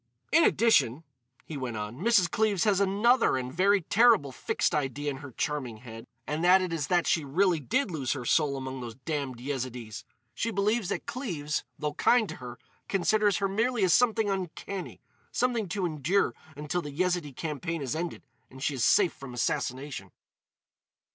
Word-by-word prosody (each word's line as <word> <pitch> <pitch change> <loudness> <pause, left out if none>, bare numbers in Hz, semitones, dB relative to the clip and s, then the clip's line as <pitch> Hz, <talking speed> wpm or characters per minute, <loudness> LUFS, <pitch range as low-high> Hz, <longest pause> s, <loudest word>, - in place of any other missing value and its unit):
"In 330 +1 +6
addition," 165 - +3 0.4
he 155 - -6
went 125 -4 -4
on, 105 +4 -6
"Mrs. 205 -2 +4
Cleves 215 -5 +1
has 205 -3 +3
another 205 - +3
and 130 0 -4
very 195 +3 +3
terrible 215 - +4
fixed - - -1
idea 145 0 -1
in 135 - -6
her 145 0 -9
charming 130 -4 -3
head, 115 -1 -11 0.2
and 150 +3 -2
that 180 +2 +7
is 150 -5 -2
that 175 -1 +2
she 160 - +2
really 170 +4 +2
did 225 - 0
lose 140 -6 -1
her 130 -4 -6
soul 145 0 +2
among 130 -1 -5
those 115 -2 -7
damned 135 -2 -4
Yezidees. 125 -4 -5 0.3
She 230 - -2
believes 210 -1 0
that - - -3
Cleves, 180 - -3
though 150 -1 -2
kind 235 +7 +3
to - - -7
her, 125 -1 -9 0.3
considers 205 +1 +2
her 200 - 0
merely 225 +3 0
as 180 -3 +4
something 225 -3 +3
uncanny—something 195 +4 -3
to 190 +1 -1
endure 165 +4 +1 0.2
until 150 +4 -2
this 145 -3 -8
Yezidee 175 -3 -1
campaign 160 +2 -4
is 130 0 -2
ended 170 0 -4 0.3
and 130 +1 -10
she 145 - 0
is 130 -4 -2
safe 190 -5 +4
from 125 -3 -10
assassination." 125 -3 -2
160 Hz, 170 wpm, -28 LUFS, 135-200 Hz, 0.4 s, that